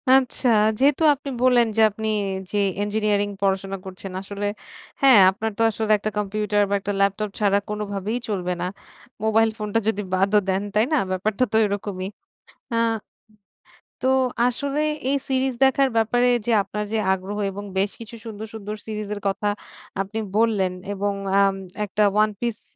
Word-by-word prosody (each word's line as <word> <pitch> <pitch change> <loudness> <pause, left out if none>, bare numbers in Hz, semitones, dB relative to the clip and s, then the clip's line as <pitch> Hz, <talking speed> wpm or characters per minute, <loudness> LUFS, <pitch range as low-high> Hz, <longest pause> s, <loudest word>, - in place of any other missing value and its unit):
আচ্ছা। 260 -1 +2 0.3
যেহেতু 285 +4 +3
আপনি 280 +1 -8
বললেন 250 -2 +5
যে - - +5
আপনি 220 +2 -5 0.4
জি 205 - -1 0.3
ইঞ্জিনিয়ারিং 205 -1 0
পড়াশোনা 195 0 0
করছেন। 190 0 -8
আসলে 200 +1 -5 0.6
হ্যাঁ, 265 -6 +8
আপনার 220 +3 -3
তো - - -1
আসলে 215 0 -1
একটা 210 +1 -3
কম্পিউটার 210 0 0
বা - - -1
একটা 205 +1 -3
ল্যাপটপ 200 +2 +1
ছাড়া 200 -2 +3
কোনভাবেই 210 +1 -3
চলবে 180 -3 -1
না। - - 0 0.6
মোবাইল 220 +1 +3
ফোনটা 210 +1 -1
যদি 210 -2 +1
বাদও 195 +3 +3
দেন। 190 +1 +1
তাই 215 +2 +4
না? - - +4
ব্যাপারটা 200 +5 0
তো - - -1
এরকমই। 200 -2 -3 0.7
আ - - +1 1.3
তো 260 - +3 0.4
আসলে 280 +4 -1 0.3
এই 280 - +2
সিরিজ 265 0 +1
দেখার 270 0 +3
ব্যাপারে 245 +3 +3 0.2
যে 240 - 0
আপনার 210 +1 -4
যে 220 - +2
আগ্রহ 190 +2 -5
এবং 200 +1 -7 0.2
বেশ 200 +1 +1
কিছু 230 0 -9
সুন্দর, 220 -1 -6
সুন্দর 210 -1 -6
সিরিজ 215 -1 -4
এর 205 - -8
কথা 200 +2 -2 0.5
আপনি 200 +3 -4 0.2
বললেন। 210 -5 +2 0.2
এবং 200 0 -1 0.3
আম 195 -1 +3 0.3
একটা 210 +1 0 0.2
One 215 0 -1
Piece 235 -2 -3
210 Hz, 160 wpm, -23 LUFS, 200-225 Hz, 1.3 s, হ্যাঁ